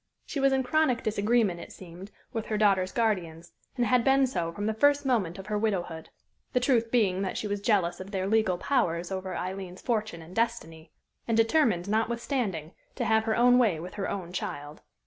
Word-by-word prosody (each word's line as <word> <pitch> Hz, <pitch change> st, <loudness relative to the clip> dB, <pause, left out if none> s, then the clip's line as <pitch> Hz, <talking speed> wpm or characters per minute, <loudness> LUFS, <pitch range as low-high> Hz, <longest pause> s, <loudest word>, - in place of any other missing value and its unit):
She 285 Hz, -, -4 dB
was 275 Hz, 0 st, +4 dB
in 265 Hz, 0 st, +2 dB
chronic 260 Hz, -2 st, +1 dB
disagreement, 215 Hz, -3 st, +1 dB
it -, -, -10 dB
seemed, 180 Hz, +2 st, -11 dB, 0.2 s
with 225 Hz, -2 st, -3 dB
her 215 Hz, -, -1 dB
daughter's 195 Hz, -3 st, +3 dB
guardians, 175 Hz, -8 st, -1 dB, 0.3 s
and 240 Hz, -, +2 dB
had 240 Hz, +2 st, +3 dB
been 270 Hz, +1 st, +4 dB
so 170 Hz, -11 st, -2 dB
from 205 Hz, +5 st, -5 dB
the 220 Hz, -, 0 dB
first 285 Hz, +5 st, +3 dB
moment 210 Hz, -10 st, 0 dB
of 195 Hz, -, -8 dB
her 210 Hz, 0 st, -1 dB
widowhood, 175 Hz, -7 st, -2 dB, 0.4 s
the 250 Hz, -, +3 dB
truth 245 Hz, -3 st, +2 dB
being 200 Hz, -6 st, +2 dB
that 190 Hz, -, -2 dB
she -, -, -3 dB
was 205 Hz, -1 st, -2 dB
jealous 200 Hz, -5 st, +1 dB
of 190 Hz, +1 st, -8 dB
their 190 Hz, -2 st, -2 dB
legal 215 Hz, -3 st, +2 dB
powers 175 Hz, -9 st, 0 dB
over 190 Hz, 0 st, -4 dB
Aileen's 185 Hz, 0 st, -5 dB
fortune 215 Hz, -8 st, -2 dB
and 170 Hz, +3 st, -13 dB
destiny, 165 Hz, -9 st, -2 dB, 0.4 s
and 230 Hz, -1 st, +1 dB
determined, 225 Hz, -, +2 dB
notwithstanding, 220 Hz, -, -1 dB, 0.2 s
to -, -, -2 dB
have 220 Hz, 0 st, +2 dB
her 220 Hz, -1 st, +1 dB
own 245 Hz, +1 st, +5 dB
way 205 Hz, -10 st, +2 dB
with 180 Hz, +3 st, -8 dB
her 200 Hz, -, -3 dB
own 180 Hz, -3 st, -5 dB
child. 145 Hz, -4 st, -5 dB
210 Hz, 200 wpm, -28 LUFS, 180-235 Hz, 0.4 s, own